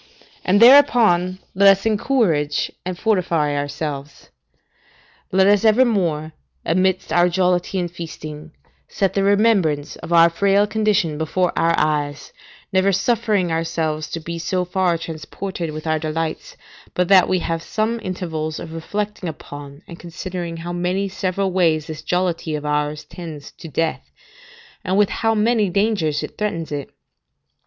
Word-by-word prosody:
and, 195 +2 +3
thereupon, 230 -8 +6 0.2
let 195 +1 +6
us 195 - -13
encourage 210 - +1
and 185 -1 -4
fortify 170 -8 +1
ourselves. 145 0 -5 1.0
Let 190 0 +4
us 205 +1 +4
evermore, 200 -10 +2 0.3
amidst 185 +1 +1
our 175 0 +4
jollity 180 +1 0
and 175 -2 -2
feasting, 160 -2 -8 0.4
set 195 -2 -1
the 195 - +1
remembrance 200 -8 +2
of - - -9
our 170 0 +7
frail 200 +3 +3
condition 210 -8 0
before 175 +3 0
our 165 0 +2
eyes, 145 -1 -1 0.4
never 190 +1 +3
suffering 205 -2 +1
ourselves 160 -1 -2
to 165 - -2
be 170 +1 -6
so 180 +2 -1
far 180 -1 +1
transported 165 +2 -6
with 155 +1 -7
our 155 -1 0
delights, 165 - -4 0.4
but 180 -1 +1
that 190 -2 +6
we 185 - +2
have 165 -2 -2
some 220 +5 -2
intervals 160 -5 -4
of 160 - -8
reflecting 205 +2 -4
upon, 145 0 -10
and 170 - -10
considering 175 0 -6
how 170 +1 -6
many 180 +3 -1
several 190 0 -2
ways 165 -4 +2
this 155 -1 -7
jollity 175 -2 -1
of 150 0 -5
ours 150 0 -1
tends 160 -5 -9
to - - -11
death, 160 +2 -2 0.7
and 190 -1 0
with 205 -1 +4
how 225 0 0
many 215 -1 +2
dangers 185 -6 0
it - - -8
threatens 170 -7 -2
it. 145 -2 -4
175 Hz, 145 wpm, -20 LUFS, 155-195 Hz, 1.0 s, our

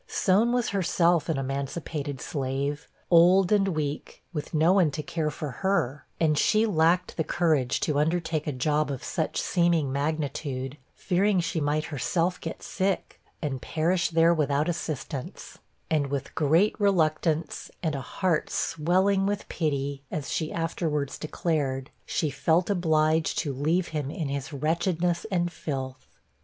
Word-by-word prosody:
Soan 205 +5 +2
was 245 -1 +1
herself 175 -4 +2
an 160 - +1
emancipated 140 +1 -3
slave, 140 +2 -3 0.2
old 180 +3 +6
and 200 -2 +4
weak, 150 -5 -3
with 150 -2 -4
no 160 +3 +4
one 185 -5 +4
to 150 +1 -4
care 155 +1 -1
for 150 -1 -5
her; 145 -9 0
and 150 -2 +3
she 215 +1 +3
lacked 175 -2 +2
the 160 - +1
courage 155 -8 +1
to 150 -8 +1
undertake 160 0 0
a - - +1
job 150 +3 0
of 135 -3 -4
such 160 -4 -2
seeming 170 -6 +2
magnitude, 140 -2 -2 0.2
fearing 195 +2 +2
she 165 -1 -1
might 150 +2 0
herself 170 +6 0
get 165 - -6
sick, 195 0 -2 0.2
and 135 -4 -2
perish 170 +2 0
there 165 0 +4
without 150 -1 +1
assistance; 155 -5 -5 0.3
and 150 -3 +1
with 140 0 -4
great 160 +8 +3
reluctance, 160 -5 +1
and 160 -2 0
a 140 - -3
heart 165 +6 -1
swelling 190 +5 +1
with 205 0 -2
pity, 140 -3 -2
as 145 -4 -4
she 155 - -1
afterwards 160 -4 -2
declared, 145 -4 -2 0.2
she 155 -3 0
felt 165 +7 +2
obliged 160 -3 +2
to 145 -4 -1
leave 160 +7 0
him 150 -3 -3
in 150 -1 -3
his 140 +1 -4
wretchedness 170 +5 0
and 175 -3 0
filth. 130 -5 -5
160 Hz, 150 wpm, -27 LUFS, 145-175 Hz, 0.3 s, old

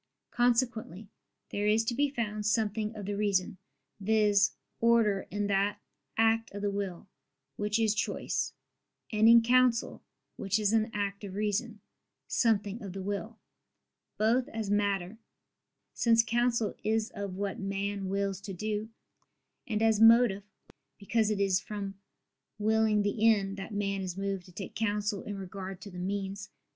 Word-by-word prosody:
Consequently 235 -5 0 0.4
there 205 +1 -1
is 215 +2 +3
to 235 - 0
be 285 +4 +1
found 215 -5 -3
something 215 0 0
of 205 -2 -6
the 205 +1 -2
reason, 200 -3 0 0.4
viz. 205 0 +3 0.3
order, 230 -4 +3
in 205 +1 -2
that 200 0 +1 0.4
act 225 0 +3
of 205 - -5
the 205 - +1
will, 195 -3 -4 0.5
which 210 +1 0
is 220 -2 +2
choice: 215 - -2 0.6
and 220 0 +5
in 230 0 +8
counsel, 245 0 +2 0.4
which 195 +1 0
is 210 0 +1
an 225 0 +2
act 200 -1 -3
of 195 -2 -7
reason, 210 +1 -2 0.5
something 215 -1 +1
of 195 -3 -7
the 195 - -5
will 205 +3 -4 0.8
both 235 +4 +2
as 220 -3 -4
matter 200 0 0 0.7
(since 230 -1 +4
counsel 235 -1 +1
is 220 +2 0
of 200 -2 -5
what 200 0 -3
man 195 0 -3
wills 195 -1 -1
to 195 -1 -6
do) 215 +3 -3 0.8
and 220 -2 0
as 220 -2 +3
motive 225 -3 +6 0.6
(because 215 +1 +1
it 210 -2 -1
is 195 -2 +3
from 200 -1 -5 0.6
willing 215 0 +2
the 205 +2 -1
end, 195 -2 0
that 195 +2 -7
man 200 -1 -1
is 185 -1 -5
moved 195 -2 -3
to - - -14
take 195 +1 -7
counsel 210 -2 -1
in 205 -1 -6
regard 190 0 -7
to 200 +1 -10
the 180 - -8
means). 200 +2 -4
205 Hz, 150 wpm, -30 LUFS, 200-225 Hz, 0.8 s, in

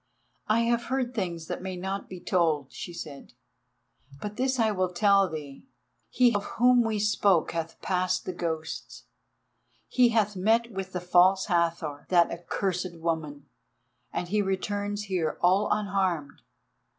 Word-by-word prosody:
"I 220 +2 +3
have 235 0 +1
heard 260 -2 -1
things 175 -7 -3
that - - -5
may 190 0 -4
not 190 +2 -4
be 185 - -8
told," 160 -7 0
she - - -7
said, 150 -7 -9 0.9
"but 210 +5 -6
this 260 +2 0
I 225 -2 +3
will 185 -3 0
tell 195 +1 +4
thee. 150 -4 -8 0.5
He 245 -2 +4
of 205 0 0
whom 245 +1 +5
we 225 -1 -1
spoke 205 -4 +2
hath 165 -1 -4
passed 185 0 0
the 185 - -3
ghosts, 160 -2 -5 0.8
he 250 -1 +4
hath 210 -3 +1
met 225 +5 +2
with 190 -2 -5
the 180 - -3
False 180 +2 +4
Hathor—that 170 -1 +1
accursed 180 0 -3
woman—and 160 +1 -6
he 210 +2 +2
returns 205 +1 -2
here 180 -6 -1
all 190 +4 +3
unharmed. 190 -8 -1
185 Hz, 140 wpm, -27 LUFS, 170-210 Hz, 0.9 s, whom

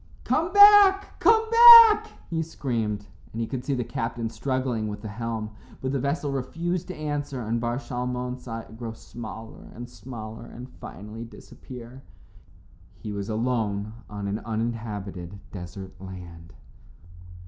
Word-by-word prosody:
"Come 330 +2 0
back, 405 -1 +7
come 450 0 +4
back," 460 -2 +10 0.2
he 165 -1 0
screamed, 115 -10 -3 0.3
and 115 - -6
he 115 - 0
could 125 +1 -5
see 140 - -1
the 125 - -1
captain 115 0 -4
struggling 130 -5 -2
with 105 0 -7
the - - -5
helm. 110 0 -4 0.3
But 130 - -3
the 140 - -1
vessel 140 +2 -2
refused 170 +6 -3
to 185 - -6
answer, 145 -3 -4
and 115 +2 -2
Bar 120 0 -1
Shalmon 125 -1 -4
saw 115 -2 -6
it 110 0 -15
grow 115 -2 -5
smaller 115 -1 -10
and 120 +1 -7
smaller 115 -2 -9
and 125 +2 -10
finally 105 +4 -9
disappear. 125 +2 -12 1.0
He 105 - -7
was 100 0 -5
alone 110 -2 -1 0.2
on 100 -1 -5
an 100 +2 -2
uninhabited 105 -5 -5
desert 95 0 -8
land. 90 -3 -10
120 Hz, 145 wpm, -25 LUFS, 110-140 Hz, 1.0 s, back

